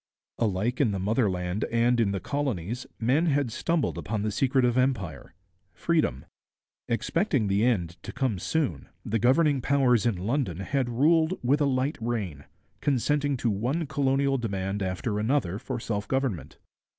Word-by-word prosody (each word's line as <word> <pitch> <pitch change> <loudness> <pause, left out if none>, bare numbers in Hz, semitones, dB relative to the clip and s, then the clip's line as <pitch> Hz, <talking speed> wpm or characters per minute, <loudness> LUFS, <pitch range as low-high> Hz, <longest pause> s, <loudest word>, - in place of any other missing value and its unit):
Alike 110 +4 0
in 130 - +3
the - - -1
motherland 95 -2 0
and 120 +1 +2
in 110 -4 +3
the 100 - -2
colonies 120 - -3
men 135 +9 +2
had 140 -5 +1
stumbled 140 - -1
upon 105 +3 -3
the 105 - -1
secret 130 +3 +2
of 120 -1 +2
empire 120 - -1 0.4
freedom. 155 - 0 0.6
Expecting 135 - +1
the 100 +2 +2
end 90 -8 0
to - - -7
come 125 -9 -1
soon, 100 - -1 0.2
the 115 +2 0
governing 135 +4 +3
powers 125 -5 +3
in 115 - +1
London 100 - -1
had 130 +4 -1
ruled 160 +8 +3
with 140 +5 +2
a - - +4
light 135 +2 0
rein, 100 - -3 0.3
consenting 145 +1 +1
to 120 -2 0
one 125 +12 -1
colonial 135 -1 +1
demand 100 -3 -2
after 95 +3 -2
another 110 -5 0
for 130 -1 -4
self 105 -3 -3
government. 130 - -2
120 Hz, 155 wpm, -27 LUFS, 100-140 Hz, 0.6 s, a